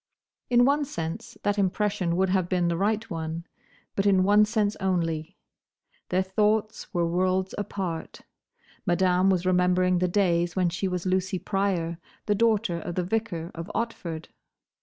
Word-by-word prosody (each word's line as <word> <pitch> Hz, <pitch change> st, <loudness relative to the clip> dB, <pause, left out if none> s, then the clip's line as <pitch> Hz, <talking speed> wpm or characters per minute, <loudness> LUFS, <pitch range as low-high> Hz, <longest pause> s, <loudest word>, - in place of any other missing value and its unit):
In 245 Hz, 0 st, +5 dB
one 285 Hz, +2 st, +3 dB
sense 165 Hz, -, -5 dB
that 205 Hz, 0 st, +1 dB
impression 195 Hz, -2 st, 0 dB
would 190 Hz, +1 st, +2 dB
have 185 Hz, -2 st, +1 dB
been 180 Hz, -2 st, +1 dB
the 170 Hz, -, 0 dB
right 215 Hz, +4 st, 0 dB
one; 165 Hz, 0 st, -4 dB, 0.5 s
but 195 Hz, +1 st, +1 dB
in 190 Hz, -2 st, +4 dB
one 205 Hz, +2 st, +5 dB
sense 210 Hz, -1 st, 0 dB
only. 165 Hz, -4 st, -1 dB, 0.7 s
Their 185 Hz, +1 st, +2 dB
thoughts 210 Hz, +3 st, 0 dB
were 175 Hz, -3 st, +1 dB
worlds 185 Hz, +2 st, 0 dB
apart. 185 Hz, -5 st, -4 dB, 0.6 s
Madame 185 Hz, 0 st, +3 dB
was 185 Hz, -2 st, +1 dB
remembering 180 Hz, 0 st, +3 dB
the 180 Hz, -, +2 dB
days 175 Hz, -3 st, +1 dB
when 180 Hz, -2 st, +2 dB
she 190 Hz, +3 st, -2 dB
was 180 Hz, -1 st, -3 dB
Lucy 185 Hz, +1 st, 0 dB
Pryor, 180 Hz, -4 st, -1 dB, 0.3 s
the 210 Hz, -, +2 dB
daughter 215 Hz, -4 st, +2 dB
of 175 Hz, +1 st, -5 dB
the 180 Hz, -, 0 dB
vicar 180 Hz, -4 st, -2 dB
of 165 Hz, +3 st, -7 dB
Otford. 170 Hz, -8 st, -4 dB
185 Hz, 155 wpm, -26 LUFS, 175-205 Hz, 0.7 s, In